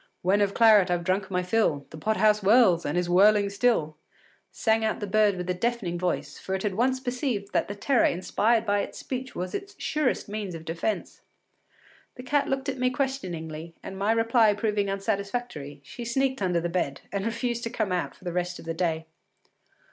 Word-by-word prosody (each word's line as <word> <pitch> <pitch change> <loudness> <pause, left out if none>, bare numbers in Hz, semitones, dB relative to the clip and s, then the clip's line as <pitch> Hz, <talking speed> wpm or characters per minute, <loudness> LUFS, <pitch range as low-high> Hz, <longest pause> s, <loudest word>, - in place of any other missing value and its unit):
” - - -48
“When 195 +3 +3
of 200 -1 +1
claret 215 -5 +6
I’ve 175 -1 0
drunk 190 +2 0
my 180 -1 0
fill, 180 -7 +1
The 155 - -9
pot 215 +7 0
house 215 -1 +4
whirls 195 - +4
and 150 +4 -1
is 180 0 0
whirling 200 +3 +4
still,” 200 -9 +1 0.5
sang 220 0 +1
out 220 - 0
the 210 - -3
bird 205 -1 +3
with 180 0 -4
a 180 - +1
deafening 190 -3 -2
voice, 180 0 -2
for 190 - -3
it 190 - -4
had 210 - 0
at 185 - -8
once 260 +2 +2
perceived 245 -5 -3
that - - +1
the 205 - -5
terror 245 +4 +2
inspired 220 +6 +1
by 205 -1 +2
its - - -4
speech 260 0 -5
was 180 +1 -4
its 395 0 -5
surest 300 -4 -1
means 205 -4 -4
of 160 0 -9
defence. 170 +6 -3 0.9
The 250 - -9
cat 280 +2 +1
looked 270 0 -2
at 270 -2 -3
me 255 0 +2
questioningly, 170 - -4
and 190 - -7
my 200 +3 +1
reply 225 -1 +3
proving 205 -2 0
unsatisfactory, 195 - -3
she 190 - -8
sneaked 265 +1 0
under 180 -3 +1
the 170 - -2
bed, 170 -6 -2
and 200 -1 -2
refused 235 +1 -2
to - - -2
come 220 -5 -2
out 180 -1 -2
for - - -21
the 175 -2 -4
rest 180 0 -2
of - - -12
the 165 - -2
day. 165 -1 -1
205 Hz, 210 wpm, -26 LUFS, 180-235 Hz, 0.9 s, claret